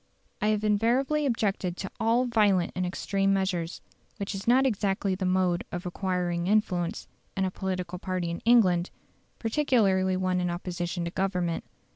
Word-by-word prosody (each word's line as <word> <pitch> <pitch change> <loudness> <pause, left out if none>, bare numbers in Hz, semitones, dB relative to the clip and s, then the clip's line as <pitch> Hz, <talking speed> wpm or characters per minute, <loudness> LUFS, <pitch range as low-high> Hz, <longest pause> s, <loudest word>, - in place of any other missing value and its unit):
I 210 - +2
have 215 0 +1
invariably 245 +8 +2
objected 200 -7 -1
to 195 - -5
all 230 +3 +2
violent 205 -7 +2
and 180 0 -1
extreme 195 +2 0
measures, 180 -3 -2 0.4
which 200 0 -4
is 195 +2 -6
not 260 +3 +5
exactly 200 -4 0
the 185 0 -2
mode 185 +1 +1
of 175 +1 -5
acquiring 180 -1 -1
influence 190 -5 0 0.3
in 190 - +2
a 185 - -1
political 185 -2 -4
party 185 -2 -2
in 170 - -4
England, 190 -7 +4 0.5
particularly 215 -7 +2
one 185 -1 0
in 180 - 0
opposition 175 0 -3
to 170 - -3
Government. 180 -3 -1
190 Hz, 155 wpm, -27 LUFS, 180-215 Hz, 0.5 s, not